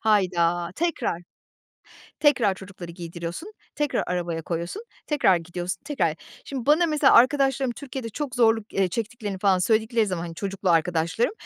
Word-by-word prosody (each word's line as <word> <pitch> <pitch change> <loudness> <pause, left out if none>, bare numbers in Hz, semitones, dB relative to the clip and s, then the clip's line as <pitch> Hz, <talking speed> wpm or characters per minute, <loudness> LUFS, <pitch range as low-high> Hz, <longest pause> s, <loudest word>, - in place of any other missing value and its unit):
Hayda, 175 -5 +2
tekrar! 320 - -1 1.0
Tekrar 250 -10 +4
çocukları 185 -2 -10
giydiriyorsun, 170 - -7 0.2
tekrar 295 -2 0
arabaya 170 -2 -2
koyuyorsun, 170 - -4 0.2
tekrar 280 - +3
gidiyorsun, 175 +2 -4
tekrar 170 - 0 0.3
Şimdi 265 -3 -5
bana 320 +4 +5
mesela 300 -3 +4
arkadaşlarım 270 0 +4
Türkiye'de 260 -3 -6
çok 265 +3 -5
zorluk, 225 -3 +2
eee, 195 -2 +2
çektiklerini 215 -1 -4
falan 190 -1 +3
söyledikleri 220 +3 +2
zaman, 180 -3 -3
hani, 170 -1 -6
çocuklu 195 0 -2
arkadaşlarım, 170 - +1
200 Hz, 135 wpm, -25 LUFS, 175-260 Hz, 1.0 s, bana